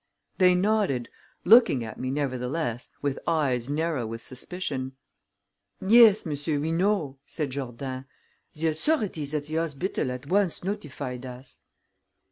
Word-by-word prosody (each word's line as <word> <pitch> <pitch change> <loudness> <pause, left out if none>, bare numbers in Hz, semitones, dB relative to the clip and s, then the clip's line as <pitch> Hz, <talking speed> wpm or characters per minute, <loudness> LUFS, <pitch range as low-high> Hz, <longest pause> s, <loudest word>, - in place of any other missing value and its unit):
They 180 -1 +6
nodded, 185 - +1 0.4
looking 210 - +6
at 110 - -8
me, 130 - -2
nevertheless, 130 -1 -2
with 140 -1 -1
eyes 140 -7 +1
narrow 150 -5 -1
with 115 +1 -6
suspicion. 135 -2 -4 0.9
"Yes, 220 0 +6
monsieur, 145 0 -2
we 155 +3 -1
know," 165 -6 0
said 150 -5 -3
Jourdain. 130 0 -5 0.5
"The 160 +1 +1
authorities 160 - 0
at 145 -1 -2
the 155 +1 -3
hospital 165 -2 -1
at 125 +2 -6
once 190 +2 +1
notified 140 -9 -4
us." 125 +1 -10
145 Hz, 125 wpm, -27 LUFS, 130-180 Hz, 0.9 s, They